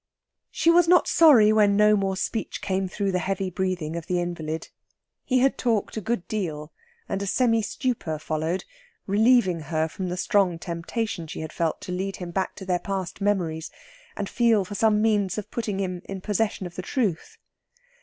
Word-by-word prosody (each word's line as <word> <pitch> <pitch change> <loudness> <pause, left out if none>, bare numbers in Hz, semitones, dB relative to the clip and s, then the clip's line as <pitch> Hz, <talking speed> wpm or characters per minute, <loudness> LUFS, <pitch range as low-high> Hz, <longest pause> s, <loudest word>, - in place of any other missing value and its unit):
She 335 - +3
was 345 0 +5
not 355 +1 +5
sorry 245 -10 +6
when 205 -2 +4
no 210 0 +5
more 195 -2 -1
speech 220 +3 -3
came 190 0 -1
through 200 +1 -2
the 180 - 0
heavy 195 +1 -2
breathing 180 -4 -2
of 170 -1 -6
the 180 -2 0
invalid. 165 -2 -4 0.5
He 255 - +1
had 270 +1 +2
talked 225 -5 0
a 220 - -3
good 215 -2 -2
deal, 155 -8 -4 0.3
and 195 - -2
a 200 - -3
semi 230 +1 +2
stupor 215 - -2
followed, 155 +4 -2 0.4
relieving 210 -3 +3
her 155 +1 -1
from 185 +3 -5
the 180 - -3
strong 185 -2 +2
temptation 170 +2 -4
she 155 - -6
had 160 - -6
felt 165 -2 -1
to - - -6
lead 190 +2 -3
him 175 -2 -7
back 190 +2 -2
to 190 - -9
their 180 -1 0
past 195 -1 -4
memories, 175 -6 0 0.5
and 200 - -2
feel 230 -4 +2
for 205 - -8
some 210 +1 +2
means 205 -4 +1
of 210 - -6
putting 215 -4 -3
him 180 -2 -3
in 195 -1 -6
possession 210 0 -1
of 175 - -7
the - - -4
truth. 195 - -2
195 Hz, 190 wpm, -25 LUFS, 175-215 Hz, 0.5 s, sorry